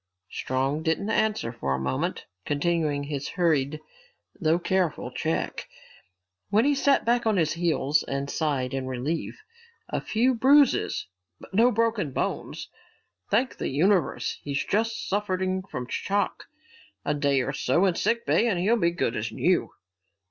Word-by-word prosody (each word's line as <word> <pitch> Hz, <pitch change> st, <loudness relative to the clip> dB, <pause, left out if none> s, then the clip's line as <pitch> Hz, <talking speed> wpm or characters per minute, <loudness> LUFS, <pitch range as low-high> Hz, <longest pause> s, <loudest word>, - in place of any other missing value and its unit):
Strong 135 Hz, +4 st, -1 dB
didn't 165 Hz, +6 st, 0 dB
answer 215 Hz, -, +1 dB
for 70 Hz, -, -2 dB
a -, -, -3 dB
moment, 65 Hz, 0 st, -2 dB, 0.2 s
continuing 150 Hz, -1 st, 0 dB
his 140 Hz, -1 st, -4 dB
hurried, 155 Hz, -5 st, +1 dB, 0.6 s
though 160 Hz, -2 st, +3 dB
careful 175 Hz, -7 st, -1 dB
check. 160 Hz, +5 st, -2 dB, 0.8 s
Then 220 Hz, +4 st, +4 dB
he 290 Hz, -, +4 dB
sat 275 Hz, 0 st, +2 dB
back 235 Hz, 0 st, +2 dB
on 215 Hz, -3 st, +2 dB
his 160 Hz, -3 st, +2 dB
heels 155 Hz, -4 st, +1 dB
and 140 Hz, 0 st, -3 dB
sighed 140 Hz, -4 st, -1 dB
in 135 Hz, -1 st, -3 dB
relief. 145 Hz, -, -3 dB, 0.5 s
"A -, -, -2 dB
few 245 Hz, +4 st, +2 dB
bruises 270 Hz, +3 st, +4 dB, 0.3 s
but -, -, -14 dB
no 230 Hz, +5 st, +5 dB
broken 225 Hz, -, 0 dB
bones, -, -, -3 dB, 0.6 s
thank 255 Hz, +1 st, +1 dB
the -, -, -2 dB
universe. 175 Hz, +4 st, +1 dB
He's 140 Hz, -1 st, -2 dB
just 225 Hz, +2 st, -1 dB
suffering 190 Hz, -2 st, -1 dB
from 125 Hz, -9 st, -6 dB
shock. 200 Hz, +9 st, -1 dB, 0.6 s
A 145 Hz, -, +1 dB
day 140 Hz, -2 st, +2 dB
or 135 Hz, -, -2 dB
so 145 Hz, +7 st, +2 dB
in 185 Hz, -, +3 dB
sick 230 Hz, +6 st, 0 dB
bay 235 Hz, -, +3 dB
and 205 Hz, -6 st, +1 dB
he'll 210 Hz, +7 st, +2 dB
be 170 Hz, -6 st, +3 dB
good 170 Hz, -8 st, -1 dB
as 110 Hz, +1 st, -3 dB
new." 180 Hz, +10 st, +1 dB
170 Hz, 150 wpm, -26 LUFS, 140-210 Hz, 0.8 s, no